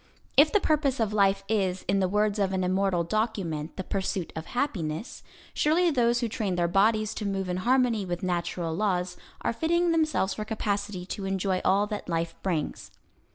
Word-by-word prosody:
If 300 +2 +6
the 415 - +4
purpose 295 -7 +1
of 215 -2 0
life 195 -1 +3
is, 190 -4 0
in 195 +2 +2
the 190 - +2
words 210 +1 +1
of 195 -1 +1
an 185 -1 0
immortal 185 -1 +1
document, 170 -6 -2
the 190 - -3
pursuit 190 -2 -3
of 160 - -6
happiness, 190 - -2 0.3
surely 335 +3 +3
those 240 -3 +2
who 235 - +1
train 210 -4 -2
their 175 -1 +1
bodies 215 +4 +2
to - - -5
move 195 -2 -2
in 180 0 -2
harmony 240 0 +2
with 175 -1 -4
natural 175 -2 -2
laws 185 -1 0 0.3
are - - 0
fitting 340 +6 +1
themselves 310 -12 +1
for 215 - -4
capacity 205 -3 -3
to 195 +1 -5
enjoy 190 -1 0
all 195 +2 +3
that 210 -3 -5
life 165 0 -1
brings. 165 -6 -2
200 Hz, 185 wpm, -27 LUFS, 180-225 Hz, 0.3 s, If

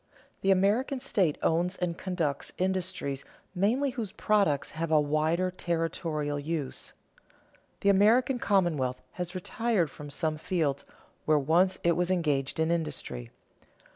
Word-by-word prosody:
The 195 - +1
American 205 +8 +2
state 195 - +1
owns 175 +3 +1
and 175 -2 -1
conducts 165 -6 -2
industries 185 -7 -2 0.3
mainly 235 +9 +1
whose 225 -6 -4
products 200 -10 +1
have 165 +1 -3
a 155 -1 +5
wider 155 +5 +1
territorial 165 -4 -2
use. 150 -2 -3 0.9
The 200 - +3
American 230 +6 +4
commonwealth 160 - +1
has 180 0 -5
retired 185 -3 0
from 145 0 -9
some 155 +1 -1
fields 155 -5 -1 0.4
where 155 -1 +4
once 170 +6 +3
it 170 - +4
was 180 0 +1
engaged 150 -6 0
in 160 +1 +2
industry. 150 - -3
170 Hz, 130 wpm, -29 LUFS, 150-190 Hz, 0.9 s, a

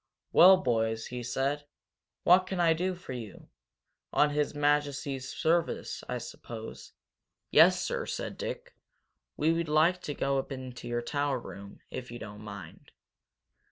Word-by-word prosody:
"Well, 185 +2 +9
boys," 115 -6 0
he 125 0 -5
said, 135 +4 -2 0.6
"what 185 +1 +6
can 190 -1 -3
I 165 -2 +5
do 180 +3 -1
for 175 -7 -8
you? 115 -5 -9 0.6
On 150 0 +3
His 150 0 0
Majesty's 145 -2 0
service, 170 0 0
I - - -1
suppose?" 115 -1 -9 0.6
"Yes, - - +7
sir," - - -2
said - - -4
Dick. - - -6 0.6
"We'd 165 +1 +1
like 165 +4 +3
to 145 - -5
go 140 0 +1
up 135 - -6
in 130 -2 -6
your 120 0 -3
tower 145 +1 0
room, 100 -4 -10
if 125 - -6
you 120 - -7
don't 105 -2 -9
mind." 100 -6 -10
140 Hz, 145 wpm, -30 LUFS, 120-160 Hz, 0.6 s, Well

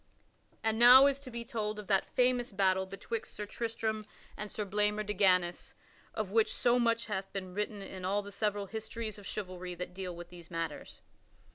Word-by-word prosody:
And 220 0 +1
now 250 +3 +10
is 280 -1 +3
to 280 -2 -9
be 235 -1 -5
told 215 -2 -3
of 210 - -7
that 195 -1 +1
famous 250 -1 +3
battle 190 -1 +2
betwixt 205 +4 -5
Sir 210 - -4
Tristram 220 0 -2 0.3
and 210 -1 -6
Sir 210 - -3
Blamor 210 +1 +1
de 210 - -2
Ganys 180 -4 +2 0.4
of 215 -3 -2
which 220 0 +3
so 240 0 +3
much 230 -1 +2
hath 195 -2 -4
been 185 -2 -5
written 205 0 -3
in 190 -1 -8
all 200 +2 0
the 205 - -9
several 205 0 -1
histories 220 0 -5
of 200 - -10
chivalry 185 -3 -5
that 180 +1 -6
deal 185 -1 -5
with 175 0 -9
these 175 -2 -12
matters. 165 -3 -5
210 Hz, 190 wpm, -32 LUFS, 190-225 Hz, 0.4 s, now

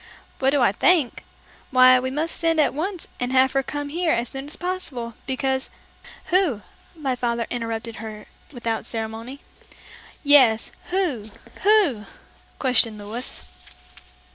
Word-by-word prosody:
"What 265 - +3
do 280 0 +2
I 240 - +5
think? 295 - +2 0.5
Why 255 0 +7
we 260 +1 -2
must 310 +5 -2
send 330 -1 +1
at 300 - +3
once 350 +5 -4
and 250 0 -2
have 260 0 +4
her 270 - +1
come 290 +1 -5
here 335 +2 0
as 235 -3 0
soon 270 +1 -7
as 300 - -4
possible, 330 -11 -3
because 265 0 -1 0.3
" - - -18
"Who?" 345 - +2 0.3
my 275 -5 -2
father 235 -1 -1
interrupted 230 -1 -4
her 215 -1 -8 0.3
without 235 -4 -3
ceremony. 225 +4 -5 0.8
"Yes; 260 -7 +6 0.2
who? 325 - -1 0.3
who?" 385 - +3 0.5
questioned 235 -4 +2
Louis. 210 - -6
260 Hz, 140 wpm, -23 LUFS, 230-300 Hz, 0.8 s, Why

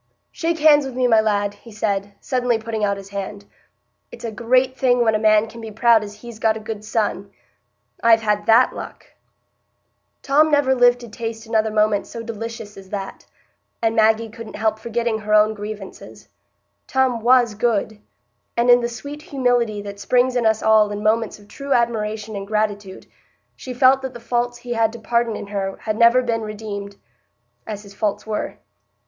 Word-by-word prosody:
"Shake 330 0 -2
hands 295 -2 +5
wi' 265 - -7
me, 255 0 0
my 225 -2 +5
lad," 205 -2 0
he 215 +3 -16
said, 200 -1 -2
suddenly 250 -3 0
putting 220 -1 -4
out 200 -1 +1
his 195 0 -10
hand. 200 0 -6 0.7
"It's - - -9
a 230 - -3
great 255 +4 +1
thing 250 -2 +2
when 220 -1 +2
a 215 - +1
man 215 0 +4
can 230 +1 -11
be 225 - -7
proud 225 +1 +3
as 205 0 -9
he's 230 0 -11
got 220 -1 +2
a - - -7
good 215 -1 -6
son. 215 -2 -2 0.7
I've 230 -1 +5
had 210 0 0
that 230 +3 +5
luck." - - -9 1.2
Tom 300 +3 +4
never 285 -3 +3
lived 245 -1 +4
to 240 - -9
taste 225 0 -6
another 220 -1 +1
moment 215 -1 +1
so 230 - -7
delicious 225 -2 -7
as 190 -1 -12
that; 195 -1 -6 0.5
and 225 -1 0
Maggie 220 0 +3
couldn't 230 0 -9
help 220 0 0
forgetting 230 0 -2
her 210 0 +1
own 215 +1 +4
grievances. 205 - -9 0.6
Tom 260 -3 +1
was 240 -1 +4
good; 215 -1 -1 0.6
and 240 +1 +4
in 245 0 +6
the 235 - -1
sweet 285 +6 -8
humility 245 -7 0
that 200 0 -8
springs 250 +3 +2
in 240 -2 +2
us 220 0 +1
all 215 -1 +5
in 205 0 -5
moments 225 +1 +1
of 205 -1 -19
true 275 +4 -3
admiration 220 -2 -1
and 195 0 -6
gratitude, 205 -2 -2 0.5
she 255 - -8
felt 260 +2 +4
that 265 -2 -6
the - - -7
faults 240 +1 -1
he 240 0 -5
had 225 -1 +2
to 235 - -9
pardon 235 0 0
in - - -6
her 195 -1 -4
had 215 -1 -2
never 235 +3 +5
been 230 -2 -1
redeemed, 205 -2 -6 0.7
as 210 -1 -6
his 200 -1 -14
faults 205 0 -2
were. 215 -1 -4
220 Hz, 190 wpm, -21 LUFS, 210-240 Hz, 1.2 s, in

